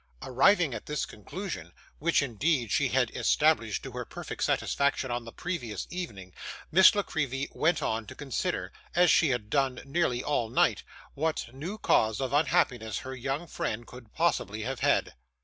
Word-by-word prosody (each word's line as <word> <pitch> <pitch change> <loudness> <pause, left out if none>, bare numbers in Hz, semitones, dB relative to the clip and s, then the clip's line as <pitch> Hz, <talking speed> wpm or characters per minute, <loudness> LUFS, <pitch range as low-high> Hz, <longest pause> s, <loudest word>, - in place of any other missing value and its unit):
Arriving 150 +4 +4
at 110 - -7
this 150 0 -1
conclusion, 105 - -7 0.3
which, 165 -1 +2
indeed, 125 -1 0
she - - +3
had - - +1
established - - +2
to - - -7
her - - -4
perfect - - -6
satisfaction 140 -2 +1
on 120 -1 -3
the 115 - -8
previous 150 -12 -4
evening, 100 - -6 0.4
Miss 190 +5 +7
La 205 - +1
Creevy 140 -5 -2
went 160 +1 +1
on 110 0 -1
to 130 - -9
consider 135 -6 -3 0.2
as 180 0 +5
she 160 - +4
had 115 -5 -2
done 135 -3 +1
nearly 140 -4 0
all 120 -6 0
night - - +2 0.3
what 155 -5 -2
new 165 +11 -5
cause 110 - +2
of 135 0 -2
unhappiness 125 -7 +2
her 130 0 -5
young 135 +6 -3
friend 120 -7 -3
could 120 -3 -13
possibly 110 +3 0
have 130 +2 -3
had. - - +2
135 Hz, 165 wpm, -29 LUFS, 115-160 Hz, 0.4 s, Miss